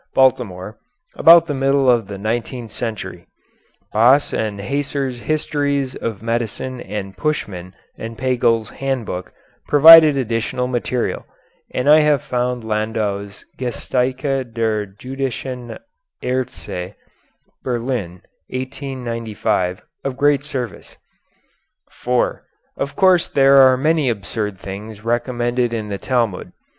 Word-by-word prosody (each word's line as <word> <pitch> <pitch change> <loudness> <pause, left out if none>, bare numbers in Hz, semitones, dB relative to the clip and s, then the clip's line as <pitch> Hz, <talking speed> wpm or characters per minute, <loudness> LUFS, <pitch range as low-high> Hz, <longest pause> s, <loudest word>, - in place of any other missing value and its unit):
Baltimore, 115 -7 +1 0.4
about 170 0 +7
the 150 - -3
middle 135 0 +2
of 120 -5 +3
the 100 - -6
nineteenth 115 +2 -3
century. 115 -1 -5 0.7
Baas 125 +6 +4
and 105 -2 -2
Haeser's 140 +2 -2
Histories 145 -2 -1
of 110 -2 -5
Medicine 120 +2 -3
and 95 -1 -6
Puschmann 95 - -3 0.2
and 115 0 -7
Pagel's 120 -3 +1
"Handbook" 125 -9 -4 0.4
provided 155 0 +9
additional 120 0 -1
material, 125 0 -2 0.4
and 125 +2 -2
I 150 +1 +8
have 150 -3 +2
found 125 -1 -2
Landau's 105 -2 -2
"Geschichte 130 +1 -1
der 110 -2 0
Jüdischen 125 +2 -5 0.5
Aerzte" 90 -7 -4 0.7
(Berlin, 120 -8 -3 0.3
1895) 120 -8 -3 0.2
of 135 -2 -3
great 145 0 +3
service.] 125 -9 -6 0.9
[Footnote 125 0 -2 0.2
4: - - -35 0.3
Of 140 0 -3
course 185 -3 +4
there 135 0 +5
are 130 -1 +7
many 155 0 +2
absurd 105 -2 -3
things 100 +3 -8
recommended 120 0 0
in 110 -2 -4
the 100 -1 -4
Talmud. 120 -7 -1
125 Hz, 110 wpm, -19 LUFS, 110-135 Hz, 0.9 s, provided